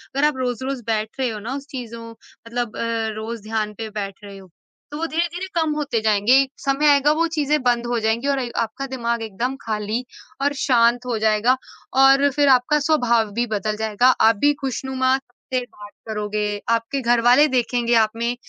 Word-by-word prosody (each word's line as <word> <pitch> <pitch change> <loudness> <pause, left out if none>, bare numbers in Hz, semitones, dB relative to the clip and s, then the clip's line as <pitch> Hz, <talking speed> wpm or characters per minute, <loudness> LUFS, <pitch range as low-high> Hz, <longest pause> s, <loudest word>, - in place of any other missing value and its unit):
अगर 280 +2 +3
आप 300 -3 -2
रोज़-रोज़ 255 +1 -3
बैठ 220 +2 -2
रहे 260 -2 +1
हो 215 -2 -5
ना, 230 +5 -5
उस 280 0 -7
चीज़ों 230 -3 -7
मतलब 230 0 -7
अ, - - -3 0.3
रोज़ 220 +1 -6
ध्यान 215 -1 -2
पे 225 -1 -5
बैठ 200 -1 -6
रहे 200 -1 -10
हो, 190 -1 -14 0.4
तो 295 - -5
वो 330 - -2
धीरे-धीरे 345 +3 -2
कम 320 -2 +1
होते 280 -7 -1
जाएँगे। 215 +2 +3
एक 270 -1 -3
समय 275 +2 +2
आएगा, 285 0 +4
वो 330 +2 +1
चीज़ें 300 0 +1
बंद 240 -1 +1
हो 240 -1 0
जाएँगी 225 +4 0
और 280 -1 +1
ए 245 -2 -3
आपका 230 +4 -4
दिमाग 235 -1 -2
एकदम 230 +5 -3
खाली 215 +2 -3 0.4
और 285 +1 +2
शांत 240 -1 +3
हो 245 -2 -1
जाएगा, 220 +4 +3 0.4
और 270 +1 +5
फिर 290 +1 +2
आपका 260 +3 +4
स्वभाव 235 -8 +2
भी 240 +3 -1
बदल 210 +2 -2
जाएगा। 220 +3 +3
आप 225 +1 +5
भी 290 - +5
खुशनुमा 265 0 0
से 255 -1 -6
बात 205 -3 -13 0.2
करोगे। 210 -1 -2 0.2
आपके 230 +4 0
घर 240 -1 +2
वाले 290 +5 +6
देखेंगे 240 0 0
आप 215 - -10
में 235 +1 -1
240 Hz, 195 wpm, -21 LUFS, 220-270 Hz, 0.4 s, वाले